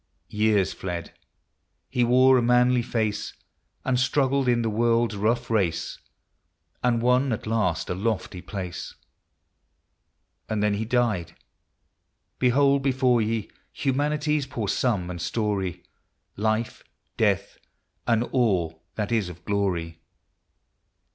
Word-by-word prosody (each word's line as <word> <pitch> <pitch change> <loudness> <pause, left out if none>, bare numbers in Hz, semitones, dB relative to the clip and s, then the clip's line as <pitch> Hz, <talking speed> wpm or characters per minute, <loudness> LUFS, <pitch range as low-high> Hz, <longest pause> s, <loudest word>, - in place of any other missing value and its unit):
Years 105 -3 +2
fled; 85 -3 -5 0.4
— - - -51 0.3
he 125 - 0
wore 130 +2 +5
a 125 - +4
manly 125 +1 +4
face, 110 -3 -2 0.5
And 125 -2 +1
struggled 135 0 +2
in 120 -1 +3
the 115 - 0
world's 115 0 +2
rough 115 +4 0
race, 85 -7 0 0.8
And 120 -2 +2
won 125 +2 +3
at 110 - -3
last 110 -7 0
a - - -1
lofty 95 -2 -2
place. 90 -3 -6 1.5
And 110 -1 0
then 105 -1 +2
he 105 +2 -2
died! 115 -7 0 1.0
Behold 140 +2 +3
before 130 -3 +2
ye 110 -1 -2 0.2
Humanity's 150 +1 0
poor 115 -5 -4
sum 95 -5 0
and 85 -2 -6
story; 95 -4 -2 0.5
Life, 110 +2 -1 0.2
— - - -48
Death, - - 0 0.2
— - - -45
and 115 -1 +3
all 95 -11 0
that 105 +1 -2
is 110 -6 +1
of 90 0 -12
Glory. 85 -5 -1
115 Hz, 125 wpm, -25 LUFS, 100-125 Hz, 1.5 s, wore